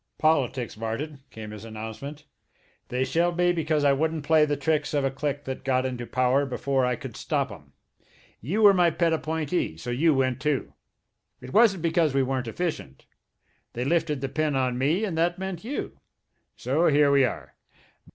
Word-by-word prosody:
"Politics, 135 -6 +1
Martin," 135 +7 -4
came 110 -1 -9
his 105 -1 -9
announcement. 110 +7 -8 0.6
"They 125 +1 -1
shelved 170 +3 0
me 175 0 +3
because 155 -3 0
I 140 -1 +5
wouldn't 160 +2 -1
play 155 0 +5
the 145 -1 -1
tricks 150 +1 0
of 140 -1 +1
a 135 - 0
clique 145 +1 -3
that 130 0 -6
got 130 -1 +1
into 125 -2 -4
power 130 +2 +2
before 130 0 0
I 125 - 0
could - - -9
stop - - -1
'em. 70 -1 -13 0.7
You 190 - -1
were 205 -1 +9
my 175 -2 +4
pet 165 0 +1
appointee, 160 - -2
so 120 +9 -5
you 150 +5 +3
went, 130 0 0
too. 150 -3 -1 0.7
It 130 +1 -10
wasn't 205 -6 +4
because 165 -4 +2
we 135 - +3
weren't 130 -2 -2
efficient. 115 - -4 0.7
They 120 +2 -3
lifted 150 -2 0
the 135 - -1
pin 150 +1 0
on 125 -2 0
me, 160 +11 +1
and 185 -6 -3
that 175 +1 +1
meant 190 -2 -5
you. 260 +6 -5 0.6
So 150 +7 +1
here 145 -1 +4
we 140 -1 +5
are. 125 - -3
145 Hz, 180 wpm, -26 LUFS, 130-160 Hz, 0.7 s, were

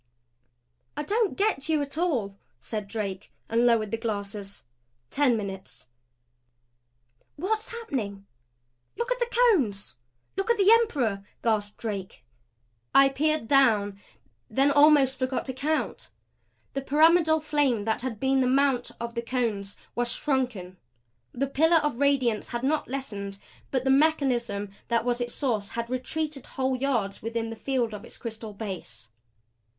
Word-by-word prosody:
"I - - -1
don't 425 +5 0
get 390 -8 0
you 315 -1 +3
at 280 0 -5
all," 260 - 0 0.2
said 210 - -5
Drake, 200 -2 -5 0.2
and 235 +2 +3
lowered 220 -3 +2
the 225 - 0
glasses. 205 -2 -5 0.5
Ten 275 -5 +3
minutes. 195 - -7 1.5
"What's 430 +7 -1
happening? 235 - -4 0.7
Look 470 +1 -2
at - - 0
the 480 - +1
Cones! 310 - +2 0.4
Look 390 +4 -2
at 470 - +4
the 400 +1 +5
Emperor!" 265 - +2 0.2
gasped 210 -3 0
Drake. 195 - -5 0.7
I 275 0 +8
peered 305 -2 0
down, 215 -7 +3 0.5
then 270 +5 +3
almost 285 -3 +5
forgot 255 0 -1
to 260 - -2
count. 300 +4 -2 0.6
The 275 - -2
pyramidal 315 +3 +4
flame 290 -8 +1
that 220 +1 0
had 245 -4 -4
been 265 0 +2
the 255 - +2
mount 265 -1 +2
of 235 0 -4
Cones 215 -6 -2 0.2
was 240 0 -1
shrunken. 245 -12 -2 0.5
The 270 +3 -1
pillar 320 +5 +4
of 295 -6 0
radiance 265 -6 +2
had 240 0 -4
not 300 +3 +1
lessened 205 -7 -5 0.3
but 260 -2 0
the 265 - +2
mechanism 250 -9 +2 0.2
that 235 0 +1
was 245 0 0
its 240 0 -2
source 220 -8 -1
had 235 +1 -4
retreated 290 +3 -3
whole 260 0 -1
yards 245 -7 -1
within 225 0 -3
the - - -5
field 235 0 -1
of 210 0 -7
its - - -9
crystal 220 -2 -7
base. 135 - -7
250 Hz, 145 wpm, -27 LUFS, 215-290 Hz, 1.5 s, I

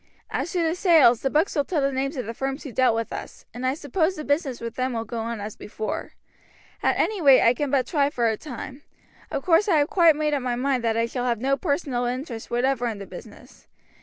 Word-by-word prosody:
As 335 - -2
to 350 -2 +1
the 325 0 +1
sales, 325 - +5
the 270 - 0
books 310 +7 +1
will 290 - +2
tell 325 +1 -1
the 275 0 +1
names 275 +2 -2
of 250 - -3
the 230 - -5
firms 270 +4 -4
who 275 - -7
dealt 255 -1 +3
with 230 0 -3
us, - - -8
and 250 +2 -3
I 260 - +1
suppose 320 +5 0
the 305 - -6
business 285 -3 -1
with 230 -1 -5
them 255 0 -2
will 225 -1 -2
go 230 +1 -5
on 230 0 -4
as 205 +1 -6
before. 215 +1 -5 0.7
At - - +2
any 425 -4 0
rate 275 -4 +7
I 235 - +5
can 290 +3 -2
but 265 -2 +2
try 285 -4 +1
for 240 -5 0
a 220 - +1
time. 265 +2 -8 0.5
Of 275 - -3
course 365 +4 +4
I 330 - +4
have 290 0 +2
quite 340 -6 +5
made 300 0 0
up 285 - 0
my 250 -1 -1
mind 255 0 0
that 225 -1 +1
I 230 - +2
shall 245 +1 -3
have 235 -3 0
no 270 +3 +1
personal 280 -5 -1
interest 245 -2 -4
whatever 245 0 0
in 225 -3 -3
the 200 - -8
business. - - -13
265 Hz, 250 wpm, -24 LUFS, 240-300 Hz, 0.7 s, rate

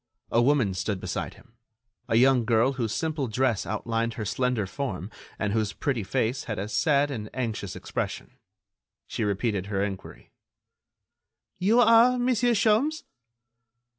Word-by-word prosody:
A 115 - +4
woman 125 -6 +2
stood 95 +1 -2
beside - - -4
him; - - -21 0.6
a 115 - +2
young 125 +1 +5
girl 115 +3 +2
whose 120 -5 -2
simple 155 -1 -2
dress 120 -2 0
outlined 115 +2 -2
her 110 - -4
slender 125 -1 0
form 95 -2 -5 0.3
and 105 -2 -1
whose 110 -2 0
pretty 130 -5 -1
face 120 +4 -1
had 105 -3 -4
a 100 - -3
sad 140 +7 +2
and 105 -5 -5
anxious 110 -6 -3
expression. - - -5 0.7
She - - -3
repeated 100 -1 -1
her 100 -1 -1
enquiry: 100 -2 -7 1.3
"You 215 +6 +3
are 235 +2 +6
Monsieur 245 -1 +2
Sholmes?" 225 +10 +2
120 Hz, 140 wpm, -26 LUFS, 105-145 Hz, 1.3 s, are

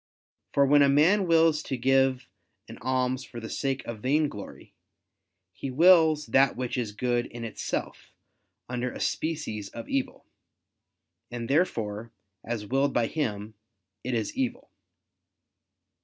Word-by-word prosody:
For 140 - +4
when 145 +1 +5
a 140 - +5
man 175 +8 +4
wills 165 -2 +4
to 135 -4 -4
give 130 0 +2 0.4
an - - -11
alms 130 0 -1
for 120 - -9
the 110 - -7
sake 135 -1 -2
of 115 -2 -6
vainglory, 135 -3 -2 0.8
he 135 - -6
wills 160 +1 +5
that 135 -2 +3
which 125 -1 -3
is 120 -4 -2
good 120 +2 -1
in 120 0 -8
itself, 110 -3 -5 0.6
under 125 0 -3
a - - -9
species 150 -11 -3
of 115 - -9
evil; 135 -1 -3 1.0
and 120 -1 -5
therefore, 115 - -1 0.3
as 115 -3 -4
willed 135 +4 0
by 120 - +3
him, 110 -7 -3 0.5
it 125 0 -2
is 110 -2 -2
evil. 260 +1 -3
130 Hz, 135 wpm, -27 LUFS, 115-150 Hz, 1.0 s, when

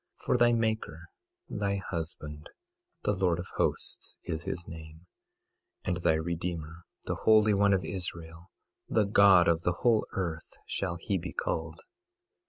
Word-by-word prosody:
22:5 - - -18
For - - +3
thy 120 0 +6
maker, 110 -1 -1 0.4
thy 100 -1 -1
husband, 80 -5 -5 0.5
the - - +2
Lord 90 -3 +1
of 90 - -5
Hosts - - -1
is 80 +1 -4
his 85 - -3
name; 80 +1 -10 0.8
and 90 -2 -1
thy 85 - +3
Redeemer, 85 0 -4 0.2
the - - -1
Holy 110 -1 +5
One 100 0 +4
of 95 -3 +2
Israel—the 85 +4 -4
God 100 -3 +6
of 85 -1 +3
the 90 0 -1
whole 115 -3 +4
earth 85 -4 -3
shall 90 -3 -2
he 95 +3 -2
be 90 +2 -6
called. 80 0 -3
90 Hz, 145 wpm, -30 LUFS, 80-100 Hz, 0.8 s, thy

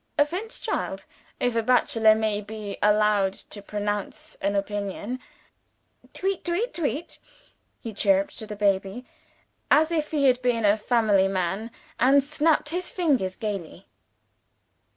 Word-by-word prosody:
A 290 - +5
fine 370 +9 -5
child - - -4 0.3
if 245 -1 0
a 230 - +2
bachelor 225 -2 +4
may 215 -1 0
be 210 -1 -7
allowed 210 -2 +3
to 205 - -11
pronounce 205 0 -4
an 200 +1 0
opinion. 205 +4 -3 0.9
Tweet 385 -1 -2
tweet 380 +8 -1
tweet!" 320 0 -3 0.6
He 225 -3 -6
chirruped 195 -1 +2
to 220 - -8
the 210 - -6
baby, 200 +3 0 0.6
as 315 +2 +4
if 310 -3 0
he 295 -3 +1
had 255 -1 +4
been 240 -3 +1
a 205 0 +5
family 215 -3 +2
man, 195 +3 -2 0.3
and 275 +3 +5
snapped 300 +1 +1
his 355 +3 -3
fingers 265 - 0
gaily. 195 -4 -5
220 Hz, 135 wpm, -25 LUFS, 205-285 Hz, 0.9 s, A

